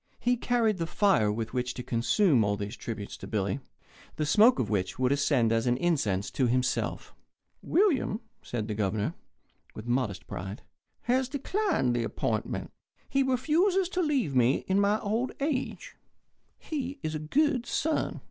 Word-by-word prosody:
He 245 Hz, 0 st, +2 dB
carried 230 Hz, -4 st, +1 dB
the 165 Hz, -, -1 dB
fire 125 Hz, -, +3 dB
with 115 Hz, +2 st, -4 dB
which 125 Hz, -1 st, -2 dB
to 125 Hz, -, -5 dB
consume 120 Hz, -, +3 dB
all 100 Hz, 0 st, 0 dB
these 100 Hz, +3 st, -5 dB
tributes 110 Hz, -4 st, -6 dB
to -, -, -9 dB
Billy, 100 Hz, +3 st, -1 dB, 0.6 s
the 155 Hz, -, -1 dB
smoke 215 Hz, -, +6 dB
of 120 Hz, -, 0 dB
which 100 Hz, -3 st, -1 dB
would 130 Hz, +1 st, +1 dB
ascend 140 Hz, -5 st, +2 dB
as 115 Hz, +1 st, +1 dB
an 120 Hz, 0 st, +2 dB
incense 120 Hz, -, 0 dB
to 130 Hz, -, +1 dB
himself. 125 Hz, +1 st, -1 dB, 0.5 s
"William," 335 Hz, -, +2 dB, 0.2 s
said 110 Hz, -3 st, -4 dB
the 110 Hz, -, -2 dB
Governor, 105 Hz, 0 st, -1 dB, 0.6 s
with 110 Hz, -, -8 dB
modest 120 Hz, -5 st, -1 dB
pride, 95 Hz, +4 st, -6 dB, 0.4 s
"has 255 Hz, +1 st, +1 dB
declined 285 Hz, -, 0 dB
the 120 Hz, -, 0 dB
appointment. -, -, -2 dB, 0.4 s
He 275 Hz, -, +2 dB
refuses 330 Hz, +9 st, +2 dB
to 365 Hz, -, -1 dB
leave 270 Hz, -, 0 dB
me 125 Hz, +1 st, +3 dB
in 190 Hz, +1 st, +3 dB
my 205 Hz, +2 st, +2 dB
old 225 Hz, +4 st, -1 dB
age. 285 Hz, -, -2 dB, 0.6 s
He 280 Hz, -2 st, -4 dB
is 155 Hz, -, -2 dB
a 155 Hz, -, -2 dB
good 255 Hz, -, +1 dB
son." 315 Hz, +6 st, -1 dB
155 Hz, 160 wpm, -28 LUFS, -, 0.6 s, smoke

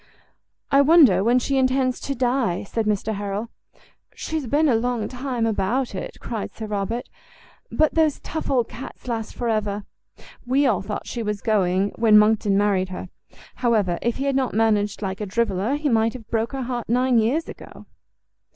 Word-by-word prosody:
"I 275 Hz, 0 st, +6 dB
wonder 280 Hz, -, +6 dB
when 240 Hz, +3 st, +3 dB
she 270 Hz, +2 st, 0 dB
intends 255 Hz, -1 st, +1 dB
to 275 Hz, -, -4 dB
die," 245 Hz, -7 st, 0 dB
said 220 Hz, +2 st, -3 dB
Mr 210 Hz, +1 st, 0 dB
Harrel. 205 Hz, +2 st, -4 dB, 0.6 s
"She's 315 Hz, -5 st, -4 dB
been 300 Hz, +6 st, +2 dB
a 265 Hz, -, +3 dB
long 230 Hz, -1 st, 0 dB
time 250 Hz, -2 st, -3 dB
about 225 Hz, +4 st, 0 dB
it," 190 Hz, -, -6 dB
cried 225 Hz, -3 st, -5 dB
Sir 220 Hz, -, -6 dB
Robert; 215 Hz, +3 st, -3 dB, 0.6 s
"but 310 Hz, -1 st, +2 dB
those 315 Hz, -3 st, +2 dB
tough 315 Hz, -, -5 dB
old 250 Hz, -4 st, +2 dB
cats 255 Hz, +1 st, -10 dB
last 225 Hz, -2 st, -4 dB
for 240 Hz, -, -3 dB
ever. 210 Hz, -2 st, -1 dB, 0.6 s
We 265 Hz, +3 st, +2 dB
all 225 Hz, -8 st, +2 dB
thought 205 Hz, +2 st, -5 dB
she 240 Hz, -, -5 dB
was 210 Hz, -2 st, -3 dB
going 195 Hz, -2 st, +1 dB
when 220 Hz, -2 st, +6 dB
Monckton 210 Hz, -1 st, +3 dB
married 200 Hz, -2 st, +1 dB
her; 185 Hz, 0 st, -7 dB, 0.5 s
however, 210 Hz, -8 st, +1 dB
if 235 Hz, 0 st, -1 dB
he 270 Hz, -, -2 dB
had 275 Hz, -1 st, +1 dB
not 265 Hz, -4 st, 0 dB
managed 210 Hz, -2 st, +1 dB
like 190 Hz, +1 st, -4 dB
a 210 Hz, -, -3 dB
driveler, 210 Hz, +3 st, 0 dB
he 300 Hz, 0 st, -2 dB
might 225 Hz, -3 st, +2 dB
have 235 Hz, -5 st, -11 dB
broke 230 Hz, +3 st, -1 dB
her 270 Hz, -1 st, -3 dB
heart 240 Hz, -2 st, -4 dB
nine 250 Hz, 0 st, +3 dB
years 255 Hz, +9 st, 0 dB
ago." -, -, -11 dB
230 Hz, 180 wpm, -23 LUFS, 210-255 Hz, 0.6 s, I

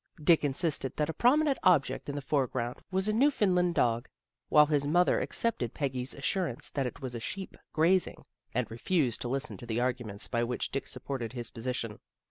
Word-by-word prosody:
Dick 155 Hz, +1 st, +4 dB
insisted 145 Hz, -1 st, 0 dB
that 150 Hz, +1 st, +1 dB
a -, -, -10 dB
prominent 275 Hz, -, +3 dB
object 175 Hz, -7 st, +3 dB
hi 145 Hz, -, -3 dB
the 145 Hz, -1 st, -4 dB
foreground 130 Hz, -4 st, -1 dB
was 190 Hz, +1 st, 0 dB
a 215 Hz, -, +2 dB
New 265 Hz, +7 st, +5 dB
foundland 180 Hz, -9 st, +2 dB
dog, 115 Hz, -1 st, +1 dB, 0.4 s
while 150 Hz, 0 st, +7 dB
his 145 Hz, -1 st, +1 dB
mother 175 Hz, +4 st, +3 dB
accepted 205 Hz, -, -1 dB
Peggy's 130 Hz, -3 st, -2 dB
assurance 145 Hz, -2 st, -2 dB
that 135 Hz, -3 st, -1 dB
it 125 Hz, -, -9 dB
was 130 Hz, -2 st, -4 dB
a 120 Hz, -, -4 dB
sheep 190 Hz, +12 st, -6 dB, 0.2 s
grazing, 175 Hz, +4 st, +2 dB, 0.3 s
and 125 Hz, +1 st, 0 dB
refused 125 Hz, +1 st, 0 dB
to -, -, -2 dB
listen 135 Hz, +1 st, -2 dB
to 120 Hz, -, -9 dB
the 115 Hz, 0 st, -1 dB
arguments 120 Hz, -5 st, -2 dB
by 120 Hz, 0 st, 0 dB
which 120 Hz, +1 st, -2 dB
Dick 135 Hz, -, -3 dB
supported 125 Hz, -2 st, -5 dB
his 120 Hz, -3 st, -4 dB
position. 115 Hz, -2 st, -4 dB
140 Hz, 190 wpm, -30 LUFS, 120-175 Hz, 0.4 s, while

